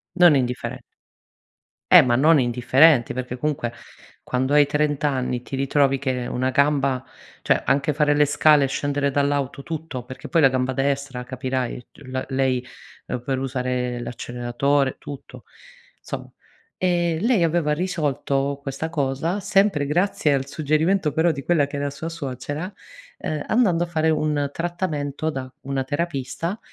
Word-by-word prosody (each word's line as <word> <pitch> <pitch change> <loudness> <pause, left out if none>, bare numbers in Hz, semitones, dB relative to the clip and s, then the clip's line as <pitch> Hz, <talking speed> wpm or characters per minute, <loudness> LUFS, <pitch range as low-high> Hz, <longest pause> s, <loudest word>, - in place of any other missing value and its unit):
Non 175 -5 +6
indifferent 125 -2 -2 1.1
Eh, - - +11
ma 120 -1 +2
non 150 +3 +5
indifferenti, 125 +3 +4
perché 125 0 -4
comunque, 140 -5 -2 0.5
quando 130 +3 -1
hai 145 -1 +6
30 150 0 0
anni, 125 -2 -2
ti 135 - -6
ritrovi 135 0 +2
che 130 -3 -2
una 130 +1 -1
gamba 140 -2 +2 0.4
cioè - - +2
anche 140 +2 +2
fare 150 0 +2
le 150 0 +5
scale, 145 0 +4
scendere 140 0 -1
dall'auto 140 -1 0
tutto, 160 -6 -5
perché 130 +1 -9
poi 165 -2 +2
la 135 - +7
gamba 130 0 -1
destra 135 -1 -1
capirai 130 -1 -3
c - - -20
la 130 0 -3
lei 130 -1 0 0.4
per 130 +2 -3
usare 125 -2 -2
l'acceleratore 125 +4 -1
tutto. 140 -2 -10 0.6
Somm - - -6 0.5
ehm, 175 -3 +1
lei 225 -6 +3
aveva 165 -2 +1
risolto 140 -5 -1
questa 140 +4 -4
cosa, 155 +5 -1
sempre 195 -6 +2
grazie 155 -1 +1
al 135 0 -1
suggerimento 155 +3 +1
però 160 +2 +3
di 140 -3 -6
quella 155 -5 +2
che 145 - -6
era 140 0 -1
sua 160 +4 -6
suocera, 150 +4 -5 0.5
uhm, 155 -1 -3
andando 185 -8 +3
a - - -4
fare 160 -1 +1
un 150 -2 0
trattamento 160 -4 -3
da 130 -3 -5
una 135 0 -2
terapista, 165 - -3
140 Hz, 145 wpm, -23 LUFS, 130-160 Hz, 1.1 s, Eh